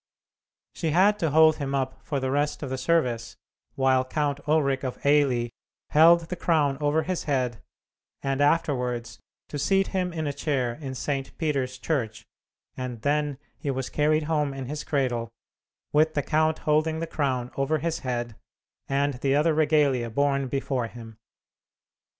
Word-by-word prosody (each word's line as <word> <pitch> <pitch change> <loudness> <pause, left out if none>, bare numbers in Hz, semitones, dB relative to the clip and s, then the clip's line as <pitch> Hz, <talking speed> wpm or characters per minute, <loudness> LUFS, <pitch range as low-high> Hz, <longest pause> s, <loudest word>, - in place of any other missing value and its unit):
She 165 - -2
had 195 +6 +4
to 165 - +1
hold 155 +1 +5
him 140 -1 -2
up 130 -1 -3
for 140 - -2
the 130 0 -2
rest 145 +2 0
of 135 - -5
the 130 - -2
service, 125 -6 0 0.4
while 130 -1 +3
Count 145 +2 -1
Ulric 140 -3 +2
of 130 -2 -3
Eily 135 -5 +3 0.4
held 165 +3 +7
the 165 +2 -5
crown 150 -6 +1
over 150 +2 +2
his 185 -1 -3
head, 125 -6 -1 0.6
and 135 0 0
afterwards 125 -6 0 0.3
to 145 - -4
seat 195 +7 +2
him 185 -2 -1
in 160 -2 -3
a 145 - -1
chair 135 -4 -1
in 135 0 -7
St. 135 +1 -3
Peter's 135 -6 -1
Church, 115 -7 -2 0.5
and 125 -3 -6
then 145 -1 0 0.2
he 145 - -3
was 130 -1 -3
carried 155 +1 +2
home 150 -3 0
in 135 -1 -5
his 150 +3 -5
cradle, 125 -5 -1 0.6
with 155 +1 +3
the 145 - +1
count 155 0 +1
holding 155 +1 +2
the 165 - -2
crown 130 -6 -2
over 135 +3 +1
his 165 +2 -2
head, 120 -3 -3 0.5
and 140 +1 +1
the 135 0 +2
other 155 +2 +3
regalia 145 -6 +2
borne 140 +2 +1
before 130 -2 -2
him. 115 -1 -11
140 Hz, 160 wpm, -26 LUFS, 130-155 Hz, 0.6 s, held